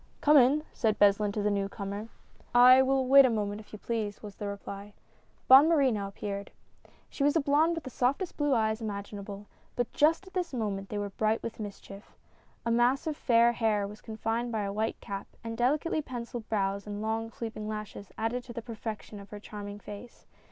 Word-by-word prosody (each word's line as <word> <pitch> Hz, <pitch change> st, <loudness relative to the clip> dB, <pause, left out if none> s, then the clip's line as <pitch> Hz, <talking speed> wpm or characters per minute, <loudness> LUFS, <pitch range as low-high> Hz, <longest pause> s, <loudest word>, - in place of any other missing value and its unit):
" -, -, -35 dB
Come 300 Hz, +1 st, +5 dB
in! 280 Hz, +4 st, +5 dB
" -, -, -30 dB
said 220 Hz, -3 st, +1 dB
Beslin 205 Hz, 0 st, +4 dB
to 210 Hz, -, -2 dB
the 210 Hz, -, +2 dB
new 200 Hz, -1 st, -1 dB
comer. 200 Hz, +1 st, -5 dB, 0.3 s
" -, -, -20 dB, 0.2 s
I 260 Hz, +1 st, +8 dB
will 265 Hz, 0 st, +2 dB
wait 275 Hz, +2 st, +8 dB
a 260 Hz, -, +4 dB
moment 210 Hz, -2 st, -2 dB
if 210 Hz, -, -19 dB
you 215 Hz, -, -7 dB
please," 215 Hz, -2 st, -3 dB
was 205 Hz, -1 st, -8 dB
the 205 Hz, -, -4 dB
reply. 200 Hz, 0 st, -7 dB, 0.5 s
Bonne 270 Hz, +5 st, +9 dB
Marie 285 Hz, -6 st, +4 dB
now 205 Hz, -3 st, -2 dB
appeared. 200 Hz, 0 st, -5 dB, 0.6 s
She 275 Hz, -, -3 dB
was 290 Hz, +2 st, +3 dB
a -, -, +5 dB
blonde 305 Hz, +4 st, +3 dB
with 330 Hz, -, -5 dB
the 260 Hz, -, -8 dB
softest 275 Hz, +10 st, 0 dB
blue 290 Hz, -2 st, +1 dB
eyes 220 Hz, 0 st, 0 dB
imagina 200 Hz, -1 st, -5 dB
ble, 200 Hz, 0 st, -8 dB, 0.3 s
but 245 Hz, -2 st, -2 dB
just 325 Hz, +5 st, +3 dB
at 375 Hz, -, -15 dB
this 355 Hz, -6 st, -2 dB
moment 200 Hz, -4 st, -3 dB
they 210 Hz, -, -4 dB
were 205 Hz, -1 st, -3 dB
bright 215 Hz, +2 st, 0 dB
with 230 Hz, -, -6 dB
mischief. 200 Hz, 0 st, -9 dB, 0.5 s
A 230 Hz, -, +1 dB
mass 240 Hz, +4 st, +2 dB
of 310 Hz, -2 st, -2 dB
fair 235 Hz, -3 st, +4 dB
hair 220 Hz, -3 st, +1 dB
was 210 Hz, +1 st, -11 dB
confined 225 Hz, +2 st, -3 dB
by 220 Hz, -2 st, -1 dB
a 200 Hz, 0 st, -3 dB
white 220 Hz, +2 st, -2 dB
cap, 200 Hz, -1 st, -6 dB, 0.2 s
and 225 Hz, 0 st, -5 dB
delicately 285 Hz, +7 st, +1 dB
penciled 240 Hz, -4 st, -7 dB
brows 200 Hz, -1 st, -1 dB
and 205 Hz, 0 st, -5 dB
long 225 Hz, +1 st, -2 dB
sweeping 225 Hz, -2 st, -6 dB
lashes 210 Hz, -2 st, -6 dB
added 235 Hz, +3 st, -2 dB
to 240 Hz, -, -9 dB
the 235 Hz, -, -6 dB
perfection 220 Hz, -2 st, -7 dB
of 200 Hz, -, -12 dB
her 210 Hz, -, -8 dB
charming 205 Hz, -1 st, -8 dB
face. 205 Hz, +4 st, -11 dB
220 Hz, 215 wpm, -29 LUFS, 205-255 Hz, 0.6 s, Bonne